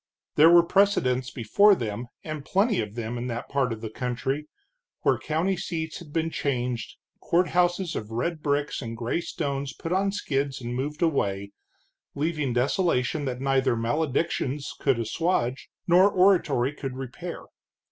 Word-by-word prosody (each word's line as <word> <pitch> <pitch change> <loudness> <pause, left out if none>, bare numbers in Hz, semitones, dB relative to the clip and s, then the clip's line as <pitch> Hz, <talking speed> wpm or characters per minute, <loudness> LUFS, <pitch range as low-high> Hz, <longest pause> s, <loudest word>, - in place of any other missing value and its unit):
There 155 +2 +7
were 170 0 +8
precedents 150 -10 +2
before 195 - +4
them, 115 - -4 0.2
and 155 -2 -5
plenty 200 - +2
of 105 0 -6
them 120 0 -4
in 120 - -3
that 120 -1 -4
part 135 -3 +1
of 110 -1 -5
the 110 - -4
country, 130 +5 -2 0.5
where 135 - +2
county 160 +8 0
seats 160 -1 -4
had 165 -4 -12
been 165 +1 -1
changed, 125 -6 -2 0.3
courthouses 175 0 +1
of 105 - -4
red 150 +8 -2
bricks 145 -1 -1
and 115 -2 -6
gray 120 +8 -1
stones 140 -3 -3
put 165 - -4
on 195 +1 +2
skids 140 -8 -2
and 120 -1 -5
moved 145 +6 -2
away, 100 -11 0 0.6
leaving 150 -2 -1
desolation 135 +2 +1
that 125 -1 -3
neither 135 -2 +2
maledictions 140 +3 -1
could 135 -4 +2
assuage 130 - -1 0.2
nor 185 +3 +6
oratory 175 -9 +3
could 135 -3 -5
repair. 130 -2 -6
140 Hz, 150 wpm, -26 LUFS, 125-170 Hz, 0.6 s, were